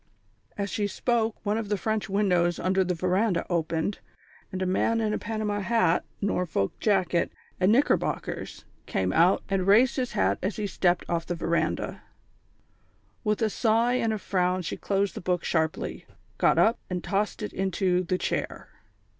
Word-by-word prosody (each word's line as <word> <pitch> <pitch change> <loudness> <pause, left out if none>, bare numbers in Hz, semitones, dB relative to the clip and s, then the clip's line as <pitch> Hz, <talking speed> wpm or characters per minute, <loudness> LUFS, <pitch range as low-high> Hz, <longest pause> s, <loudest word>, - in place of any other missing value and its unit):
As 200 -1 -2
she 205 -1 0
spoke, 225 +2 0
one 210 +2 +1
of 215 -3 -5
the 205 - +1
French 215 +3 -2
windows 180 -4 +2
under 190 +1 +1
the 180 -1 -1
verandah 185 +2 +1
opened, 165 +3 -1 0.5
and 185 - -4
a 185 - 0
man 225 +5 +1
in 215 -1 0
a - - -1
panama 215 -1 -2
hat, 205 -4 +2 0.2
Norfolk 180 - 0
jacket 185 -5 +1 0.3
and 185 +2 +4
knickerbockers, 270 +6 0 0.2
came 95 -1 0
out 175 +3 +4
and 195 -1 0
raised 235 +7 +5
his 250 -2 -2
hat 95 +1 +1
as 195 +2 -2
he 210 - -2
stepped 180 -3 +1
off 170 -1 -2
the 175 - -2
verandah. 170 0 -1 1.2
With 215 0 0
a 220 - +2
sigh 230 +2 +2
and 230 -3 +1
a 215 - -1
frown 185 -2 0
she - - -3
closed 200 -1 -1
the - - -7
book 180 -1 0
sharply, 160 -1 -1 0.3
got - - +4
up 225 +2 +4
and 180 -1 -3
tossed 210 +2 -1
it 210 - -5
into 190 -1 +1
the 185 0 -1
chair. - - -3
195 Hz, 170 wpm, -27 LUFS, 180-215 Hz, 1.2 s, raised